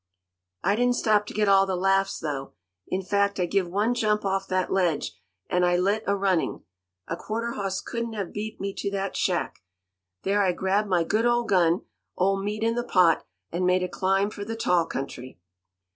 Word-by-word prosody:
"I 200 +2 +3
didn't 245 +2 +2
stop 210 -3 +2
to - - -7
get 210 -1 +2
all 195 0 +5
the 190 - 0
laughs, 195 +1 +2
though. 140 -3 -4 0.3
In 190 +1 -2
fact, 200 0 +1
I 180 - +2
give 185 +1 0
one 210 +6 +1
jump 210 -3 +1
off 195 0 0
that 185 -1 0
ledge, 175 - +1 0.4
and 180 0 +1
I 175 0 +3
lit 200 +4 +1
a 200 - +2
running. 190 -4 0 0.4
A - - -2
quarter 230 +2 -3
hoss 195 -4 -3
couldn't 235 -1 -4
have 200 -4 -4
beat 215 +1 -5
me 195 0 -3
to 200 - -1
that 195 -1 -3
shack. 180 -2 -1 0.6
There 205 +1 +2
I 185 -2 +2
grabbed 195 +3 0
my 175 -3 +3
good 215 +7 +1
old 240 -1 +1
gun, 175 -3 +3 0.4
old 195 +1 +1
Meat 210 +2 -2
in 230 0 +2
the 240 +1 -1
pot, 180 -8 +3 0.2
and 175 +2 -1
made 180 0 +3
a - - 0
climb 195 +3 +1
for 205 - -6
the 225 +2 -4
tall 180 -7 +2
country." 130 -3 -6
195 Hz, 200 wpm, -26 LUFS, 180-210 Hz, 0.6 s, all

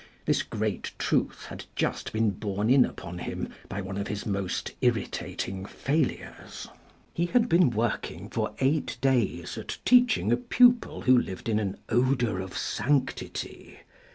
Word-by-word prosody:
This - - +2
great - - -3
truth - - 0
had - - -8
just - - -1
been 110 -1 +2
borne 100 +3 -1
in 130 -1 +7
upon 90 +1 -7
him - - -4 0.2
by 100 - -3
one 95 +1 -5
of 100 - -3
his 105 -1 -4
most 100 -3 -2
irritating 95 0 -1
failures. 140 +9 -3 0.5
He 170 +1 0
had 240 +4 +3
been 175 - +5
working 115 -1 -2
for - - -2
eight 140 +3 0
days 130 -6 0
at - - -6
teaching 245 - +5
a 120 - +4
pupil 245 - +4
who 130 - +5
lived 95 -5 -1
in 110 -1 +2
an 100 -3 -2
odour 120 -4 +2
of 95 -1 -5
sanctity. 135 +5 -2
115 Hz, 150 wpm, -27 LUFS, 100-140 Hz, 0.5 s, in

